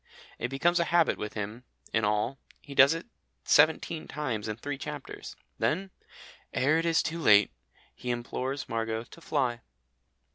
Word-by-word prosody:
It - - -1
becomes 170 +7 +2
a 170 - +2
habit 170 -1 +3
with 105 - -5
him 105 +3 -5 0.3
in 110 - +2
all, 105 +5 0 0.2
he 140 - -11
does 140 +3 +7
it 165 - -6 0.4
seventeen 155 +1 +3
times 125 -9 -3
in 110 - -2
three 140 +4 -5
chapters. 145 -2 -7 0.2
Then, 190 +3 0 0.6
"ere 150 +5 +3
it 165 - 0
is 165 -1 +3
too 165 +2 -3
late," 105 -9 +6 0.4
he 125 - -7
implores 125 +3 -3
Margot 115 0 -2
to 165 - -15
fly. 130 -7 0
135 Hz, 155 wpm, -29 LUFS, 115-160 Hz, 0.6 s, does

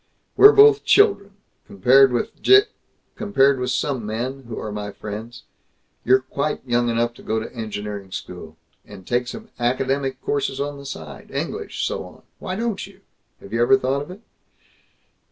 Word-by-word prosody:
"We're 415 - +9
both 425 0 +6
children, 400 - +3 0.3
compared 130 +7 +5
with 120 - -3
Je 400 +1 +7 0.5
compared 140 - +2
with 125 0 -2
some 130 -1 -1
men 120 +5 -4
who 115 - -7
are 110 - -5
my 105 0 -5
friends. 110 +4 -8 0.6
You're 130 +2 +4
quite 140 +2 -3
young 120 -1 +1
enough 120 +1 0
to - - -16
go 110 0 -2
to 110 - -8
engineering 105 -3 -6
school. - - -8 0.3
And 100 -3 -13
take 120 +3 -1
some 220 - -8
academic 130 +2 -1
courses 135 -1 -2
on 145 0 -4
the 140 - -10
side 75 - -9
English, - - -4
so - - -3
on. - - -15 0.2
Why 185 - -5
don't 230 0 -3
you? - - -19 0.4
Have 100 - -12
you 115 - +1
ever 125 +3 +5
thought 135 +2 -1
of 145 - -9
it?" 185 +4 -11
130 Hz, 170 wpm, -22 LUFS, 115-140 Hz, 0.6 s, We're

